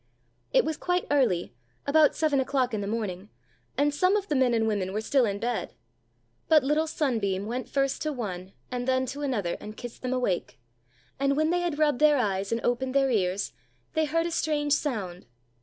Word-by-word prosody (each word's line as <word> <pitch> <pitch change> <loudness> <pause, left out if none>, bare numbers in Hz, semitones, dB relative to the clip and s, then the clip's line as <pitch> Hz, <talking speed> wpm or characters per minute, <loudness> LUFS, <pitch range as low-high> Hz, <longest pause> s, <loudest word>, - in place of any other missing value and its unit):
It - - +4
was 315 -1 -2
quite 360 0 0
early, 235 - +2 0.3
about 300 +1 +4
seven 305 -3 +2
o'clock 260 -2 0
in 210 - -1
the 200 - -3
morning, 205 -3 -3 0.5
and 290 0 +2
some 365 +6 +3
of 405 -1 -1
the 300 - +1
men 260 -2 +3
and 225 -1 +1
women 195 -3 -1
were 210 - 0
still 255 +3 +3
in 200 -2 -1
bed; 240 +2 -3 0.7
but 310 -3 +5
little 300 +3 +1
sunbeam 220 -11 -1
went 245 +4 -4
first 275 -1 0
to 310 - -1
one 195 -8 -5 0.2
and 245 0 -3
then 260 0 +2
to 270 +3 -6
another 220 -11 -1
and 215 +1 -9
kissed 245 -2 -8
them 255 - -2
awake, 245 - -1 0.6
and 275 0 +2
when 310 +1 +2
they 355 - +2
had 345 -4 -2
rubbed 300 -4 +2
their 300 -1 +5
eyes 200 -5 -1
and 230 0 0
opened 255 +2 0
their 270 -1 +3
ears, 190 - 0 0.4
they 315 0 +2
heard 330 +2 0
a 340 - -2
strange 295 -3 +1
sound. 200 - -2
260 Hz, 200 wpm, -27 LUFS, 215-295 Hz, 0.7 s, but